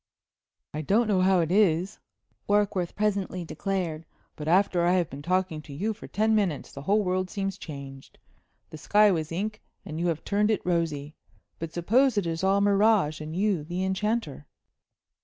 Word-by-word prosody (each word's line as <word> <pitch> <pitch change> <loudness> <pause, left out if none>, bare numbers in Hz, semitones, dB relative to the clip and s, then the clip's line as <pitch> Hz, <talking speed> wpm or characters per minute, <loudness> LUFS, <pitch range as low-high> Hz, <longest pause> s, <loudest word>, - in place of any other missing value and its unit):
"I 150 - -3
don't 210 +9 +2
know 195 -3 +2
how 185 -1 +4
it 165 0 -1
is," 190 -1 +2 0.5
Warkworth 205 -4 +1
presently 200 -4 -1
declared; 175 -4 -3 0.3
"but 150 - -7
after 180 0 +3
I 175 +1 +3
have 180 -3 +1
been 140 +2 -7
talking 180 -1 -1
to 150 -2 -11
you 205 +10 -2
for 215 - -11
ten 220 +1 +1
minutes 195 -9 0
the 140 - -8
whole 205 +8 +2
world 185 0 -1
seems 195 -1 -3
changed. 140 -6 -10 0.5
The 155 - -9
sky 210 +5 +4
was 160 -3 -2
ink, 210 +5 -3 0.2
and 160 -4 -6
you 175 - 0
have 165 -2 -2
turned 210 +1 +1
it 215 - 0
rosy. 160 -4 -1 0.5
But 165 -1 -5
suppose 225 +9 +2
it 200 - +1
is 165 +1 -3
all 195 +1 +3
mirage, 200 -6 +3
and 155 +1 -6
you 195 -4 +1
the 175 +4 -3
enchanter?" 190 - -2
185 Hz, 175 wpm, -27 LUFS, 160-205 Hz, 0.5 s, how